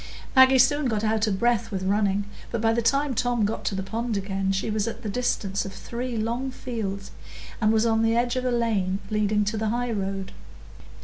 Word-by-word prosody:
Maggie 260 0 +7
soon 290 +2 +4
got 215 -3 -1
out 220 0 +1
of 195 -3 0
breath 235 -1 +1
with 190 -3 -3
running, 200 0 +1 0.2
but 235 - -2
by 225 +1 +2
the 235 - +1
time 275 +4 +2
Tom 245 -2 +1
got 215 - -3
to 195 - -1
the 190 - -2
pond 225 +2 -2
again 195 0 -1
she 195 +3 -1
was 210 0 0
at 230 +1 -5
the 215 - -3
distance 200 -4 -1
of 195 - -7
three 240 +4 -5
long 235 +4 -1
fields, 205 -6 -5 0.5
and 215 0 +4
was 220 0 +3
on 225 -1 +2
the 225 0 +2
edge 240 +1 +1
of 255 - -1
the 250 - 0
lane 215 -6 +1
leading 210 0 +1
to 215 +2 -1
the 220 0 0
highroad. 200 -5 -2
220 Hz, 210 wpm, -25 LUFS, 200-240 Hz, 0.5 s, Maggie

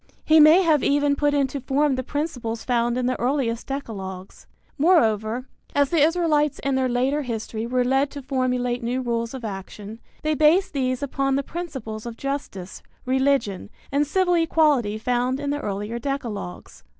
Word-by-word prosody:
He 315 +1 +6
may 310 +5 +7
have 310 -5 +3
even 285 0 +2
put 290 0 +1
into 275 -1 0
form 280 +2 +1
the 260 - -1
principles 255 -6 -4
found 240 -1 0
in 250 - 0
the 255 0 -1
earliest 245 -2 -1
decalogues. 195 -9 -7 0.3
Moreover, 240 - +2 0.3
as 285 -1 +2
the 330 -3 +3
Israelites 305 -2 +2
in 275 - 0
their 260 -1 +1
later 260 +4 +1
history 225 -3 -4
were 250 +1 +1
led 270 +3 +2
to 285 -1 -8
formulate 250 -2 -1
new 250 +2 -2
rules 235 0 -2
of 250 -3 -7
action, 205 +2 -7 0.2
they 310 0 +1
based 310 +6 +3
these 255 -1 -1
upon 275 -1 0
the 275 - 0
principles 265 -10 -6
of 230 -1 -7
justice, 275 -10 -5 0.2
religion 260 -7 0 0.2
and 285 +1 +1
civil 360 +3 +2
equality 300 -10 +2
found 250 +3 0
in 285 0 -2
the 290 0 -2
earlier 210 +2 -4
decalogues. 235 -9 -5
265 Hz, 165 wpm, -23 LUFS, 235-290 Hz, 0.3 s, may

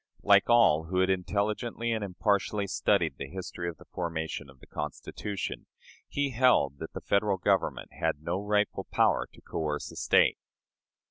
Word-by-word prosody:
Like 100 +1 +5
all 115 -10 +5
who 90 +3 -3
had 95 0 +3
intelligently 105 +6 -1
and 110 -2 -1
impartially 100 +1 0
studied 90 -6 +1
the 70 - -4
history 90 -1 -5
of 85 - -9
the - - -16
formation 80 -3 -4
of 65 -1 -17
the - - -15
Constitution, 95 +6 -5 0.4
he 140 -1 -1
held 110 - +3
that 80 - -7
the - - -6
Federal 100 -1 +1
Government 95 0 0
had 75 - -2
no 90 +4 -1
rightful 105 0 0
power - - +2
to - - -18
coerce 75 -2 -3
a - - -12
State. - - +3
95 Hz, 160 wpm, -29 LUFS, 80-105 Hz, 0.4 s, Like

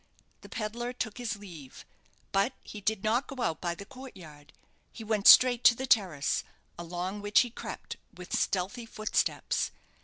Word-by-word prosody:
The - - -13
pedlar 240 +3 -4
took 245 -2 -4
his 230 -4 -2
leave; 170 -10 -12 0.5
but 200 +7 +2
he 210 - -9
did 210 0 -1
not 230 +5 +1
go 260 -3 -5
out 160 - -1
by 175 -1 -2
the 200 - -10
court 260 +1 -11
yard. 150 -4 -14 0.4
He 225 - -9
went 215 -1 +1
straight 250 -1 +8
to 235 - +8
the 265 - -4
terrace, 180 - +2 0.3
along 180 +4 -5
which 205 0 +4
he 245 -1 -3
crept - - -7
with 180 -3 -6
stealthy 200 +6 -1
footsteps. 215 -1 -1
210 Hz, 165 wpm, -29 LUFS, 180-240 Hz, 0.5 s, straight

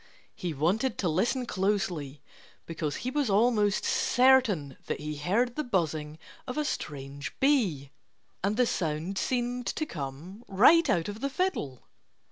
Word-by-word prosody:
he 175 - -4
wanted 180 - 0
to 185 - 0
listen 225 - +1
closely 185 - -2 0.4
because 160 -3 -3
he 255 - -1
was 285 -3 0
almost 210 -1 +2
certain 240 - +3
that - - -2
he 150 0 -5
heard 220 +11 0
the 305 - -1
buzzing 160 - -1 0.3
of 255 - -5
a 300 - 0
strange 140 - -5
bee. 200 - +2 0.5
And 205 +2 0
the 250 - +4
sound 170 -1 -2
seemed 245 +1 -1
to 310 - -1
come 160 - -7
right 275 - +5
out 170 -9 +1
of 205 +1 -6
the 275 - 0
fiddle! 265 - -2
195 Hz, 145 wpm, -28 LUFS, 150-250 Hz, 0.5 s, right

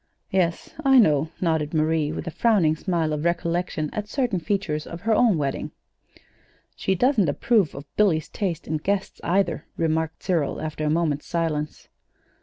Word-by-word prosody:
"Yes, 175 -3 0
I 270 -1 +6
know," 155 - +4
nodded 160 -3 0
Marie, 155 -1 +1
with - - -5
a 170 - -4
frowning 185 -7 +3
smile 165 -2 -1
of 150 0 -2
recollection 170 -2 -1
at 210 -1 -3
certain 245 -9 0
features 170 -5 -2
of 170 +1 -8
her 225 0 +1
own 220 -5 +4
wedding. 140 -2 -2 1.1
"She 190 - 0
doesn't 215 - +3
approve 200 +2 +2
of 140 +1 -8
Billy's 175 -7 +3
taste 175 -6 -3
in 155 - 0
guests, 195 +5 -2
either," 175 -1 0
remarked 160 -1 -1
Cyril, 165 -7 0
after 155 0 -4
a - - +1
moment's 155 -2 0
silence. 155 -3 -2
170 Hz, 160 wpm, -24 LUFS, 155-195 Hz, 1.1 s, I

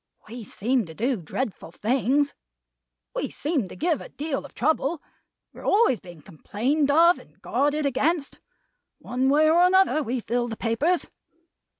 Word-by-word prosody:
We 235 +2 -8
seem 230 +2 -1
to 160 - -11
do 250 +7 0
dreadful 190 - -5
things; 265 +8 +1 0.8
we - - -2
seem 290 - -2
to - - -11
give 330 -1 0
a - - -10
deal 290 -2 -4
of - - -14
trouble; 310 +2 0 0.5
we - - -13
are - - -11
always 410 - +3
being 175 -5 -13
complained 260 - -1
of 335 +4 +5
and - - -20
guarded 290 +1 0
against. 280 +3 0 0.6
One 255 +2 -1
way 300 +3 +4
or 330 +2 +5
another, 370 -3 +4
we 255 -2 -2
fill 240 +1 -1
the 225 -2 -6
papers. 280 +12 0
275 Hz, 160 wpm, -25 LUFS, 230-310 Hz, 0.8 s, of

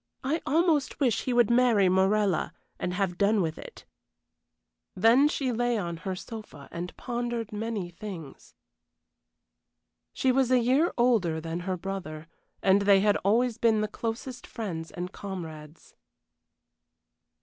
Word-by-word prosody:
I 300 +5 0
almost 315 -2 +2
wish 245 -8 +1
he 255 - 0
would 240 -2 +4
marry 235 -5 +4
Morella 190 0 +2 0.3
and 180 - -2
have 180 -2 -1
done 205 +2 +3
with 165 -4 -1
it." 480 - -11 1.1
Then 230 +9 +5
she 270 -3 -1
lay 240 0 0
on 170 -4 -3
her 185 +3 -4
sofa 210 - -9
and 175 +1 -6
pondered 240 -3 -3
many 210 -4 -3
things. 170 -6 -9 1.6
She 260 - +1
was 260 -1 +2
a 255 - +5
year 260 +8 +3
older 220 -10 +2
than 165 +1 -4
her 185 +1 -3
brother, 170 -4 -6 0.4
and 195 +1 +5
they 200 -1 +5
had 205 0 +3
always 230 +4 +1
been 225 -2 +3
the 215 - 0
closest 235 +3 -5
friends 170 -8 -5
and 180 +1 -6
comrades. 160 -6 -8
210 Hz, 140 wpm, -28 LUFS, 180-240 Hz, 1.6 s, Then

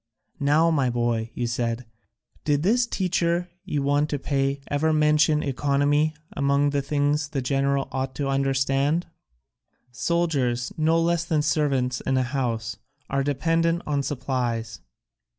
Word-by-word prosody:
'Now, 150 +4 +3
my 140 -5 +2
boy,' 120 -1 -1
you 120 - -1
said, 120 0 -2 0.6
'did 145 0 +1
this 235 +5 +3
teacher 180 -3 0 0.2
you 145 -2 -1
want 145 +2 +2
to 145 - -1
pay 140 0 -1
ever 150 +2 +1
mention 150 0 +3
economy 145 +3 +1 0.2
among 140 0 +2
the 140 -1 0
things 145 +1 0
a 140 - 0
general 135 +1 0
ought 130 0 -3
to 140 - -2
understand? 135 +3 +1 0.9
Soldiers, 130 -5 0
no 160 +1 +2
less 170 0 +1
than 160 -3 0
servants 135 -5 0
in 130 0 0
a 130 - +2
house, 120 -4 -2 0.3
are 135 0 +1
dependent 165 +4 +1
on 145 -2 0
supplies.' 120 -6 -2
140 Hz, 135 wpm, -25 LUFS, 130-155 Hz, 0.9 s, Now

